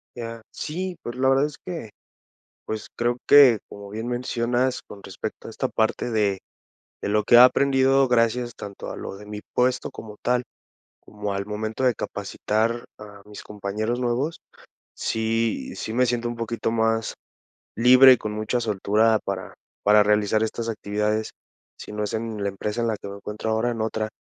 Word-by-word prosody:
Ya 115 -1 -6
sí, 180 +3 -4
pues 120 - -5
la 130 +1 +2
verdad 135 +2 +4
es 150 -1 -6
que, 165 -12 -6 0.8
pues, 110 -1 -4
creo 120 +1 +1
que, 135 -6 +8
como 100 0 -10
bien 110 +3 -5
mencionas, 125 +1 0
con 100 - -12
respecto 95 -1 -7
a - - -7
esta - - -2
parte 110 +2 0
de 105 -4 +1 0.6
de - - -1
lo 105 +1 +3
que 120 - +2
he - - +11
aprendido, 135 +1 +5
gracias 120 0 +1
tanto 100 -1 -8
a - - -6
lo - - -6
de 105 - -12
mi 105 0 -6
puesto 125 +1 +1
como 110 -5 -10
tal, 125 0 +2 0.6
como 105 -1 -5
al 100 0 -3
momento 110 +4 -4
de 125 -1 +4
capacitar 115 +2 -2
a 105 -1 -12
mis 105 0 -10
compañeros 105 +3 -3
nuevos, 125 +6 -1 0.6
sí 115 0 -1
sí 110 - -5
me 125 +2 +3
siento 120 0 -1
un 120 - -6
poquito 115 0 -2
más 115 0 +1 0.6
libre 125 +3 +8
y 125 - +6
con 105 -1 -5
mucha 110 +3 -1
soltura 110 0 +2
para 95 -1 -4 0.3
para 105 0 +6
realizar 105 +1 +2
estas 115 +1 -3
actividades, 105 0 -1 0.5
si - - -9
no 105 0 -2
es 105 - -3
en 110 -2 -3
la 100 - +1
empresa 105 +4 -3
en 115 - +1
la 110 -2 -1
que - - -9
me 100 - -7
encuentro 105 +2 -4
ahora, 110 +2 +1
en 115 - -5
otra. 110 0 -2
115 Hz, 180 wpm, -24 LUFS, 105-120 Hz, 0.8 s, he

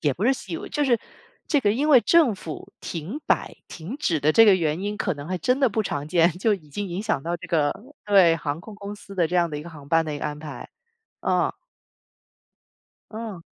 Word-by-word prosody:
也 145 -3 +2
不 185 - -3
是 265 - +5
习 270 - -6
以 - - -1
为 400 +2 -7
就 295 -1 0
是， 240 -4 +3 0.5
这 290 -4 +2
个 205 - +2
因 280 +8 0
为 265 -5 +8
政 305 -6 +4
府 165 -4 -8
停 175 - -5
摆 - - 0
停 180 - -7
止 170 - 0
的 150 +2 +2
这 225 - +7
个 200 -3 +6
原 160 0 -1
因， 205 +1 -3
可 185 -6 -1
能 145 +3 -8
还 185 - -2
真 250 +7 +1
的 265 - +5
不 220 +1 -1
常 145 -7 -3
见， 170 0 +4
就 215 +3 +2
已 155 -6 -12
经 200 +7 -4
影 175 +2 -3
响 215 -9 -1
到 170 +3 -2
这 - - -10
个 150 -3 +2 0.3
对， 190 -5 +6
航 150 -1 -3
空 210 +4 -11
公 205 0 -7
司 200 -1 -12
的 170 -4 +1
这 180 - 0
样 170 -1 +3
的 150 - -5
一 - - -7
个 170 - -10
航 145 -3 -12
班 165 +1 +3
的 155 - -4
一 145 - -4
个 - - -6
安 150 -1 -3
排， 150 -5 -8 0.5
啊。 - - +1 1.6
嗯。 215 -5 -6
185 Hz, 260 characters per minute, -24 LUFS, 155-220 Hz, 1.6 s, 为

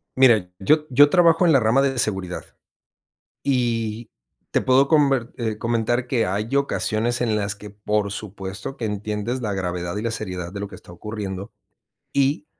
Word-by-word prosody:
Mira, 115 -8 +5
yo 150 +10 +3
yo 145 +3 +6
trabajo 170 0 +5
en 170 - +5
la 135 - +6
rama 115 +4 +3
d 140 -1 +2
de 130 - -3
seguridad. 95 -5 -1 1.0
Y 115 -4 -1 0.4
te - - +2
puedo 130 +2 +4
comber, 135 -6 +3
eh, 110 -3 -2
comentar 120 +2 0
que 120 -3 +1
hay 105 +7 -2
ocasiones 120 -4 0
en 115 -3 +1
las 100 -1 -1
que, 105 +1 -10
por 105 0 -1
supuesto, 100 +3 -6
que 115 - -3
entiendes 105 +4 -3
la 105 -4 -2
gravedad 90 -1 -3
y - - -2
la 115 0 -1
seriedad 90 -6 -4
de 100 - -6
lo 100 - -4
que - - -11
está - - -14
ocurriendo 100 0 -6 0.6
y 140 +2 +1
110 Hz, 175 wpm, -23 LUFS, 100-130 Hz, 1.0 s, yo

